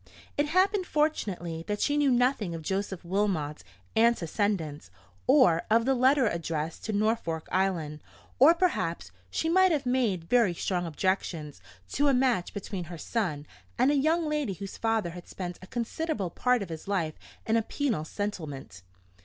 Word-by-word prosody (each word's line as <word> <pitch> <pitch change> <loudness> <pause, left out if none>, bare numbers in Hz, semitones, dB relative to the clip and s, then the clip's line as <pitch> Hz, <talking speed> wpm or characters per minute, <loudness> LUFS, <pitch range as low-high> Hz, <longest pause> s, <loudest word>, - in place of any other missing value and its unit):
It 290 +1 +1
happened 375 +3 +2
fortunately 190 - -1
that 210 0 -2
she 290 - +1
knew 290 -1 +3
nothing 245 -8 +2
of 160 - -7
Joseph 190 0 -3
Wilmot's 175 -6 -1 0.3
antecedents, 200 - +1 0.4
or 255 - +5
of 230 +1 +4
the 270 - +3
letter 260 +1 +4
addressed 165 -3 -3
to 220 - -2
Norfolk 205 -6 0
Island; 175 -6 0 0.4
or 305 +6 +8
perhaps 330 - -1 0.2
she 320 - -1
might 375 +2 +5
have 290 -4 0
made 240 -9 +1
very 205 -1 +3
strong 175 0 -1
objections 160 - -2 0.3
to 290 +1 +2
a 275 - +4
match 250 -8 +1
between 195 -2 -5
her 170 +1 -8
son 155 -7 -2 0.3
and 270 - +4
a - - +2
young 315 +4 +2
lady 300 -8 -1
whose 195 +1 -7
father 225 -6 0
had 175 0 -10
spent 180 -2 -6
a 185 - -11
considerable 235 - -3
part 250 +1 +1
of 190 - -9
his 160 +2 -7
life 175 -6 0 0.3
in 220 - +1
a 230 - +4
penal 230 - -1
settlement. 155 - -5
205 Hz, 160 wpm, -28 LUFS, 170-260 Hz, 0.4 s, or